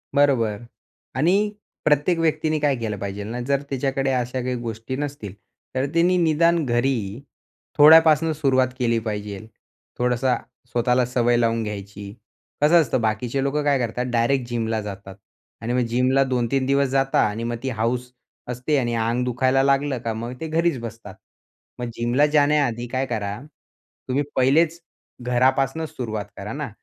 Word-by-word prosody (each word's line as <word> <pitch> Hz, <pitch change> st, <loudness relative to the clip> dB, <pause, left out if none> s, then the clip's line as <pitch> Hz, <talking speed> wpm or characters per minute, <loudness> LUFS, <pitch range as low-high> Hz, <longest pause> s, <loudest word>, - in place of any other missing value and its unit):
बरोबर 130 Hz, -7 st, +3 dB, 0.6 s
आणि 165 Hz, +8 st, +3 dB, 0.5 s
प्रत्येक 150 Hz, +4 st, +3 dB
व्यक्तीने 155 Hz, -1 st, +1 dB
काय 145 Hz, -2 st, +2 dB
केलं 110 Hz, -3 st, -3 dB
पाहिजेल 100 Hz, +1 st, -5 dB
ना? 120 Hz, +3 st, -4 dB
जर 140 Hz, 0 st, +1 dB
तिच्याकडे 135 Hz, 0 st, -1 dB
अशा 125 Hz, 0 st, -1 dB
काही 125 Hz, 0 st, -2 dB
गोष्टी 115 Hz, +2 st, -5 dB
नसतील, 135 Hz, -8 st, -5 dB, 0.4 s
तर 130 Hz, +1 st, +1 dB
तिने 175 Hz, +2 st, +3 dB
निदान 165 Hz, 0 st, +3 dB
घरी 120 Hz, -3 st, -1 dB, 0.6 s
थोड्यापासून 160 Hz, +1 st, +7 dB
सुरुवात 130 Hz, -4 st, +2 dB
केली 115 Hz, -2 st, +1 dB
पाहिजेल, 105 Hz, -1 st, -5 dB, 0.5 s
थोडासा 125 Hz, +1 st, +1 dB, 0.4 s
स्वतःला 125 Hz, +1 st, +2 dB
सवय 120 Hz, -1 st, +1 dB
लावून 115 Hz, -1 st, +1 dB
घ्यायची. 100 Hz, -1 st, -7 dB, 0.5 s
कसं 165 Hz, +3 st, +6 dB
असतं 130 Hz, -3 st, -1 dB
बाकीचे 115 Hz, +4 st, -1 dB
लोकं 145 Hz, +2 st, 0 dB
काय 145 Hz, -1 st, +3 dB
करतात 125 Hz, +1 st, -2 dB
डायरेक्ट 120 Hz, +2 st, +1 dB
जिमला 115 Hz, -2 st, -1 dB
जातात 100 Hz, -1 st, -8 dB, 0.5 s
आणि 120 Hz, +2 st, -2 dB
मग 125 Hz, -, +2 dB
जिमला 130 Hz, +3 st, +3 dB
2-3 130 Hz, 0 st, 0 dB
दिवस 140 Hz, +1 st, +2 dB
जाता 135 Hz, 0 st, +1 dB
आणि 110 Hz, +3 st, -5 dB
मग 120 Hz, 0 st, -2 dB
ती 135 Hz, -, -1 dB
हौस 125 Hz, +3 st, -1 dB, 0.4 s
असते 125 Hz, +5 st, -1 dB
आणि 120 Hz, -3 st, 0 dB
अंग 115 Hz, +2 st, 0 dB
दुखायला 130 Hz, +2 st, +2 dB
लागलं 140 Hz, -1 st, +1 dB
का 115 Hz, -, -1 dB
मग 115 Hz, +3 st, -5 dB
ते 160 Hz, -, -3 dB
घरीच 165 Hz, -3 st, +1 dB
बसतात. 115 Hz, -4 st, -9 dB, 0.6 s
मग 120 Hz, -, -3 dB
जिमला 120 Hz, +5 st, +2 dB
जाण्याआधी 145 Hz, -5 st, +2 dB
काय 130 Hz, +2 st, -1 dB
करा 105 Hz, -4 st, -3 dB, 0.7 s
तुम्ही 135 Hz, +3 st, 0 dB
पहिलेच 160 Hz, +6 st, +3 dB, 0.4 s
घरापासून 130 Hz, +5 st, +1 dB
सुरुवात 110 Hz, -8 st, -5 dB
करा 105 Hz, +3 st, -6 dB
ना. 145 Hz, -1 st, -4 dB
125 Hz, 150 wpm, -23 LUFS, 115-140 Hz, 0.7 s, थोड्यापासून